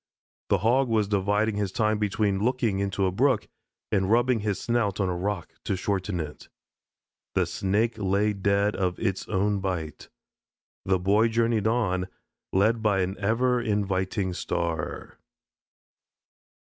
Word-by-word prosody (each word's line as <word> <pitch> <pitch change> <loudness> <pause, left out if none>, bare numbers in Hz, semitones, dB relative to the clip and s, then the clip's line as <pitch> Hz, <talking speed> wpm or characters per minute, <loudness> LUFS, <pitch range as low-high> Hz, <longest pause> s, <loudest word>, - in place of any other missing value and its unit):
The - - +4
Hog 125 +5 +2
was 110 -3 +2
dividing 105 +2 +1
his 100 -2 -1
time 110 0 +1
between 105 -1 0
looking 120 -5 +1
into 100 0 0
a 95 - +1
brook 130 +7 +2 0.4
and 95 -2 +1
rubbing 120 +1 +3
his 105 -2 -2
snout 115 -5 0
on 95 -2 +1
a 90 - -1
rock 95 0 -3
to - - 0
shorten 95 -1 -2
it. 75 -2 -7 0.9
The - - +3
Snake 110 +4 0
lay 100 +2 +1
dead 100 +1 +1
of 90 -2 -1
its 95 0 -2
own 100 0 +1
bite. 90 -5 -4 0.8
The 95 0 +2
Boy 100 +5 +3
journeyed 115 -2 +1
on, 95 -6 0 0.4
led 110 +4 +2
by 105 -3 +2
an 95 +1 -1
ever 120 +4 +1
inviting 100 -3 -1
star. 85 -3 -3
100 Hz, 140 wpm, -26 LUFS, 95-110 Hz, 0.9 s, The